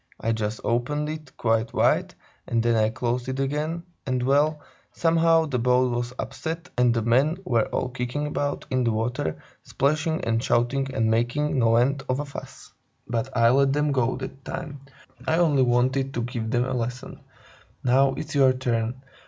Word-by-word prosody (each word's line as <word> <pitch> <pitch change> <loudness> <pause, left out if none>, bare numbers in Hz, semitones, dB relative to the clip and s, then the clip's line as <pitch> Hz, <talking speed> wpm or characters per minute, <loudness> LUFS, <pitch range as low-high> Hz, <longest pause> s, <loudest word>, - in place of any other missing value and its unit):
I 115 - 0
just 110 -1 -2
opened 145 +6 0
it 155 -3 -8
quite 115 0 0
wide - - +2 0.3
and 115 -1 +1
then 120 0 +2
I 110 -1 +3
closed 125 +2 -2
it 130 +1 -3
again, 150 +5 -2 0.2
and, 130 -2 -1
well, 145 +4 +2 0.3
somehow 165 -1 +3
the 135 -5 -2
boat 125 +1 +3
was 120 0 -2
upset 160 +6 -5
and 125 -1 +4
the 115 -1 0
men 135 +9 +3
were 115 -6 +2
all - - -2
kicking 125 +4 -3
about 145 -1 -2
in 130 -1 +1
the 115 - +2
water, 110 -7 -2 0.2
splashing 155 +4 0
and 115 0 +1
shouting 135 +3 +1
and 110 0 +2
making 125 +5 +1
no 115 -1 +4
end 135 +4 +2
of 130 +2 +1
a 145 - -2
fuss. 140 - -10 0.3
But 120 +3 -2
I 115 0 +5
let 135 +1 +3
them 150 0 +1
go 130 -2 +1
that 135 +1 -8
time, 145 -1 -6 0.5
I 160 - +2
only 155 -6 +3
wanted 130 +2 +1
to 120 - -1
give 120 -2 -4
them 120 +1 +1
a 130 - -2
lesson. 125 0 -4 0.6
Now, 135 +2 +3
it's 155 0 -5
your 135 -3 +5
turn. 125 0 -2
130 Hz, 180 wpm, -25 LUFS, 120-145 Hz, 0.6 s, I